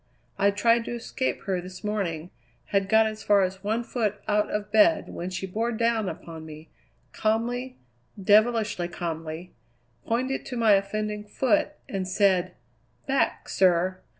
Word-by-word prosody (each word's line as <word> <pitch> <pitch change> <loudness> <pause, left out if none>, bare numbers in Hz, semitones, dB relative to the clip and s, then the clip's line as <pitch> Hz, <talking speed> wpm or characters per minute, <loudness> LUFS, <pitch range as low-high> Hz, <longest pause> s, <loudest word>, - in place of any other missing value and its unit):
I 200 - +5
tried 230 +3 +3
to 240 - -4
escape 240 +2 -3
her 185 -2 -1
this 185 +3 -10
morning; 180 -6 -2 0.4
had 195 -1 +2
got 220 +1 +5
as 215 0 -4
far 205 -2 +4
as 190 +1 -3
one 220 +3 0
foot 215 -4 -2
out 210 0 +2
of 210 0 -3
bed 220 +10 +4
when 175 +2 -5
she 185 +1 -4
bore 225 +5 -1
down 230 -3 +1
upon 165 -1 -8
me, 155 0 -11 0.4
calmly, 240 +4 -1 0.4
devilishly 210 -2 +3
calmly, 165 0 -5 0.5
pointed 255 +4 -1
to 250 - -4
my 225 -2 +4
offending 210 +1 0
foot, 210 +1 +1
and 190 -2 -3
said: 185 -1 +2 0.5
"Back, 275 0 0
sir!" 185 0 +2
205 Hz, 150 wpm, -26 LUFS, 185-225 Hz, 0.5 s, I